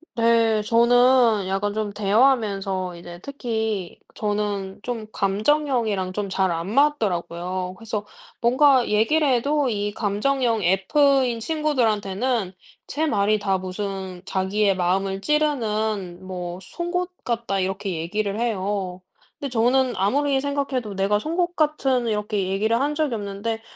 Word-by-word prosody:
네. 230 -2 +3
저는 235 -2 +4
약간 205 +2 -1
좀 210 -2 -2
대화하면서 200 -5 +1
이제 175 0 -10
특히 220 -8 -3 0.2
저는 205 -2 -2
좀 235 -3 -4
감정형이랑 215 -2 0
좀 205 0 -2
잘 190 -2 +1
안 170 +4 -3
맞더라고요. 185 - 0
그래서 220 -2 -4 0.4
뭔가 255 +1 +4
얘기를 285 +9 +2
해도 280 +2 +1
이 205 -1 -2
감정형 225 +2 0
F인 250 - +3
친구들한테는 230 - 0 0.3
제 315 +2 -1
말이 215 -5 +2
다 195 -2 0
무슨 190 -1 -5
"자기의 195 +1 +1
마음을 190 +2 0
찌르는 215 - -1
뭐 180 -1 -5
송곳 355 - -3
같다." 230 -5 -1
이렇게 190 +1 -2
얘기를 200 +6 -2
해요. 195 -5 -2 0.4
근데 280 - -4
저는 250 +2 +2
아무리 270 +7 +1
생각해도 275 -7 -2
내가 200 +2 +1
송곳 345 +5 -1
같은 270 -6 +1
이렇게 210 -3 -1
얘기를 220 +4 +1
한 295 +2 0
적이 300 -5 0
없는데 210 +2 -4
215 Hz, 280 characters per minute, -23 LUFS, 195-255 Hz, 0.4 s, 저는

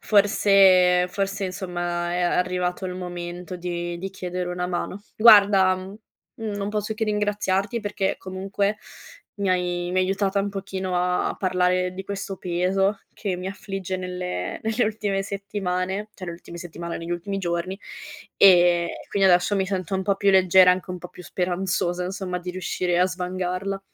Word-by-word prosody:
Forse 195 -3 +5
forse, 195 +1 -2
insomma, 175 -2 -3
ehm, 175 - -1
è - - +1
arrivato 180 +1 0
il 180 - -3
momento 175 0 -6
di 175 -1 -4
di 195 +2 -5
chiedere 180 -1 -4
una 180 0 -2
mano. 180 +2 -3 0.2
Guarda, 200 -4 +7
mhmm, 190 +3 -9 0.6
non 200 0 -3
posso 210 0 -2
che 220 - -1
ringraziarti 205 0 0
perché 205 -3 -1
comunque 195 +2 -2 0.6
mi 200 -1 -1
hai 175 -1 0
mi 185 - +1
hai 185 - +3
aiutata 195 +1 0
un 200 - -1
pochino 190 -2 -3
a 180 0 0
parlare 180 -1 +1
di 190 +1 -6
questo 195 -1 -5
peso 185 +3 0
che 195 -4 -3
mi 180 +1 -6
affligge 195 -2 -5
nelle 180 - -4
nelle 220 +2 +1
ultime 205 -2 -1
settimane, 195 0 -3
cioè 185 - -8
le 170 - -5
ultime 170 0 -11
settimane, 170 0 -6
negli 165 +1 -7
ultimi 195 +3 -3
giorni, 175 +1 -2 0.6
ehm, 175 -3 +6 0.2
quindi 195 -1 +3
adesso 180 +3 +4
mi 195 -1 +1
sento 190 -1 -3
un 190 - 0
po' 195 0 +1
più 200 0 +3
leggera, 185 -1 +6
anche 185 +1 -4
un 180 - -4
po' 180 - -9
più 180 - -13
speranzosa, 180 0 -1
insomma, 185 -1 -3
di 180 +1 -5
riuscire 180 -1 -1
a 180 - +5
svangarla. 185 +1 -3
185 Hz, 165 wpm, -24 LUFS, 180-195 Hz, 0.6 s, Guarda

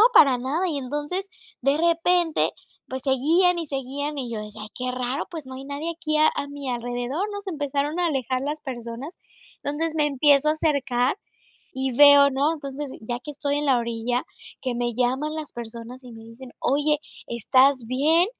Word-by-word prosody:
para 265 -3 +7
nada, 295 +9 0
y 315 - -2
entonces 295 +8 -3 0.3
de 275 +3 +3
repente, 335 0 +2 0.4
pues 260 0 -5
seguían 325 +7 +3
y 330 - -4
seguían 280 +2 -4
y 255 -3 -3
yo 220 - -3
decía: 210 0 -8
"Ay, 210 - -6
qué 250 0 -2
raro, 250 +3 -2
pues 320 -5 -7
no 260 - -8
hay 265 +1 -8
nadie 285 +4 -4
aquí 315 -2 -1
a 310 +1 +6
a 285 - -3
mi 285 -1 -7
alrededor", 245 - -2
¿no? 405 - -4
Se 400 -1 -6
empezaron 290 +1 -1
a 350 - +2
alejar 260 -4 -1
las 295 +2 -3
personas, 245 +4 -7 0.4
entonces 310 +3 -1
me 300 -2 +2
empiezo 285 +1 +4
a 305 - +5
acercar 275 -4 +1 0.6
y 265 -2 -2
veo, 285 0 +8
¿no? 280 +4 +1
Entonces, 285 -2 -6
ya 240 +2 -4
que 295 - -8
estoy 285 0 -1
en 295 - -1
la 265 -3 +4
orilla, 235 +2 -1 0.4
que 255 -2 -1
me 240 -1 -1
llaman 260 +5 0
las 310 -2 -6
personas 235 +2 -8
y 250 - -10
me 225 0 -11
dicen: 235 +3 -12
"Oye, 295 +2 +2 0.3
¿estás 255 +3 +3
bien?". 305 +8 +3
275 Hz, 190 wpm, -24 LUFS, 250-305 Hz, 0.6 s, veo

